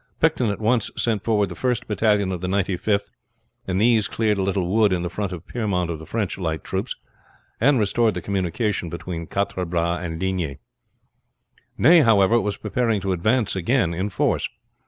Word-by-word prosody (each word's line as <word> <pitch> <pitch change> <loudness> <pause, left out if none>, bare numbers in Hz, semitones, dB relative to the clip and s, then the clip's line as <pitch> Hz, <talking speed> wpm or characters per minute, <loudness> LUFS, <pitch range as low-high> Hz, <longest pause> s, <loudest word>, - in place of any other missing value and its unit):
Picton 150 -8 +2
at 100 - -3
once 115 +1 +1
sent 110 -4 0
forward 105 -4 +1
the - - -6
first 125 +1 -1
battalion 105 -2 +1
of 90 -2 -4
the 90 - -2
Ninety 95 0 0
fifth, 100 +3 -1 0.6
and 95 0 0
these 110 -1 +3
cleared 105 -3 0
a - - +1
little 95 -1 0
wood 105 +2 +3
in 90 -1 0
the 85 - -3
front 100 +1 -3
of 90 -2 -7
Piermont 95 -7 -1
of 80 - -5
the 80 - -11
French 105 -4 -2
light 80 -4 -2
troops, - - -3 0.6
and 135 +4 +4
restored 110 0 +2
the 90 - -3
communication 95 0 -1
between 85 0 -6
Quatre 100 -2 -2
Bras 85 0 -1
and 80 -2 -5
Ligny. 90 -7 -2 1.2
Ney, 165 +6 +7
however, 115 -3 +4
was 105 0 -2
preparing 115 0 0
to 95 - -1
advance 110 +5 +1
again 95 -1 +1
in 95 +5 -2
force. 90 - 0
100 Hz, 185 wpm, -23 LUFS, 90-110 Hz, 1.2 s, Ney